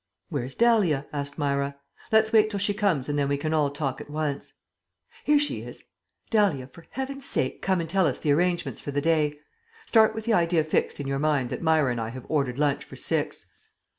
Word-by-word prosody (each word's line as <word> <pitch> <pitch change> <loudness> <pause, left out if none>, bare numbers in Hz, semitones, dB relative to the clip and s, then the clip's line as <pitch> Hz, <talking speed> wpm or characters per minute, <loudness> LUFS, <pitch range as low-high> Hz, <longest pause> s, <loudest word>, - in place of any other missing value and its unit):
"Where's 135 -5 -4
Dahlia?" 205 -12 +3
asked 140 -1 -4
Myra. 140 -1 -1 0.4
"Let's 220 0 +4
wait 215 -1 +5
till 205 - -3
she 205 +1 +1
comes 195 - 0
and 145 0 -1
then 140 -1 +1
we 140 - +1
can 155 +2 -2
all 150 -2 +2
talk 140 -1 -3
at 150 - -11
once." 150 -2 -3 0.7
"Here 295 0 +4
she 290 0 +1
is. - - -9 0.5
Dahlia, 200 - +2
for 160 +6 -16
Heaven's 265 +1 -5
sake 130 - -1
come 190 -2 +1
and 165 - -3
tell 190 +1 +2
us - - -1
the 150 - 0
arrangements 175 +3 0
for - - -7
the 145 0 0
day. 150 -1 +1 0.5
Start 220 -1 +4
with 220 -1 -5
the 235 - +2
idea 170 -3 +3
fixed 155 - -1
in 145 - -4
your 135 0 -1
mind 145 -5 +1
that - - -4
Myra 160 -5 +3
and 120 -1 -2
I 110 - -3
have 130 +1 -9
ordered 135 -5 0
lunch 145 -1 +1
for - - -12
six." - - -1
155 Hz, 215 wpm, -26 LUFS, 140-200 Hz, 0.7 s, wait